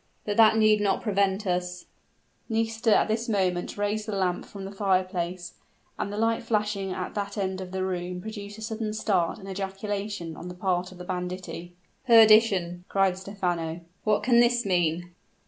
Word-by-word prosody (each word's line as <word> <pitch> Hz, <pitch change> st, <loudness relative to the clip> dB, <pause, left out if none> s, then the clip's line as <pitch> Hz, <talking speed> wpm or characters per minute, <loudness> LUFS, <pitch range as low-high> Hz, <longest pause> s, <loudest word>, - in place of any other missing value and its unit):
But 205 Hz, -, -1 dB
that 220 Hz, -1 st, +6 dB
need 215 Hz, -1 st, +4 dB
not 195 Hz, -2 st, +1 dB
prevent 200 Hz, -1 st, +1 dB
us 180 Hz, -1 st, -2 dB, 0.3 s
" -, -, -41 dB
Nisida 225 Hz, 0 st, +2 dB
at -, -, +2 dB
this 225 Hz, +2 st, -1 dB
moment 185 Hz, -4 st, 0 dB
raised 210 Hz, +1 st, -1 dB
the 215 Hz, -, -2 dB
lamp 180 Hz, -2 st, 0 dB
from 195 Hz, -1 st, -8 dB
the 195 Hz, -, -6 dB
fire 195 Hz, -2 st, +2 dB
place, 180 Hz, -1 st, -4 dB, 0.5 s
and 200 Hz, -, -2 dB
the 205 Hz, -, -5 dB
light 225 Hz, +1 st, +1 dB
flashing 210 Hz, -4 st, -1 dB
at 185 Hz, 0 st, -4 dB
that 200 Hz, 0 st, -4 dB
end 190 Hz, -1 st, -2 dB
of 185 Hz, -, -6 dB
the 190 Hz, 0 st, -2 dB
room, 180 Hz, -1 st, -3 dB
produced 205 Hz, +1 st, -7 dB
a 220 Hz, -, -8 dB
sudden 220 Hz, -1 st, -3 dB
start 190 Hz, -6 st, 0 dB
and 195 Hz, -, -11 dB
ejaculation 195 Hz, -2 st, -4 dB
on 175 Hz, -, -8 dB
the 180 Hz, -, -7 dB
part 180 Hz, 0 st, -1 dB
of 185 Hz, -, -12 dB
the 180 Hz, -, -8 dB
banditti. 180 Hz, -1 st, -5 dB, 0.3 s
"Perdition!" 215 Hz, -6 st, +6 dB
cried 195 Hz, -2 st, +2 dB
Stephano, 175 Hz, -4 st, -3 dB, 0.2 s
"what 215 Hz, -1 st, +2 dB
can 240 Hz, -2 st, +5 dB
this 240 Hz, 0 st, +3 dB
mean?" 175 Hz, -1 st, 0 dB
195 Hz, 180 wpm, -27 LUFS, 180-215 Hz, 0.5 s, that